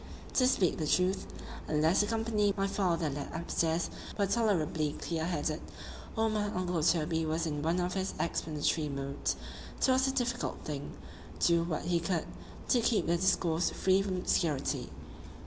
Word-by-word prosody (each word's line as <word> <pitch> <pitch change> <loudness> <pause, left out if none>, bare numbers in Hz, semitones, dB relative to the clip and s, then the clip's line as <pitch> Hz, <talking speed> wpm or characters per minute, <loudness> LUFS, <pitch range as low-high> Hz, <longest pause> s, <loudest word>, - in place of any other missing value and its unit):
To 255 - +4
speak 195 -9 +2
the 155 - -1
truth, 185 +4 +2 0.4
unless 155 +4 +3
the 205 - 0
company 220 -3 +1
my 195 - +1
father 180 -5 +1
led 145 0 -4
up 165 +1 -5
stairs 165 0 +1 0.3
were 200 - +3
tolerably 170 -9 +1
clear 165 -1 -3
headed, 155 -2 -1 0.5
or 225 0 +2
my 215 -1 0
uncle 180 -4 -1
Toby 160 0 +2
was 160 +1 0
in 150 -2 -2
one 165 +4 +1
of 180 0 -1
his 190 0 -2
explanatory 155 -1 0
moods, 140 0 -2 0.4
'twas 260 0 +3
a - - +2
difficult 245 -2 -1
thing, 145 -2 -5 0.4
do 170 -1 +3
what 165 -3 -2
he 175 0 +1
could, 165 -1 -1 0.4
to 245 - +4
keep 225 -1 +2
the 170 - +2
discourse 170 -2 +2
free 190 +1 +2
from 195 -1 -2
obscurity. 155 -5 0
175 Hz, 165 wpm, -31 LUFS, 160-200 Hz, 0.5 s, To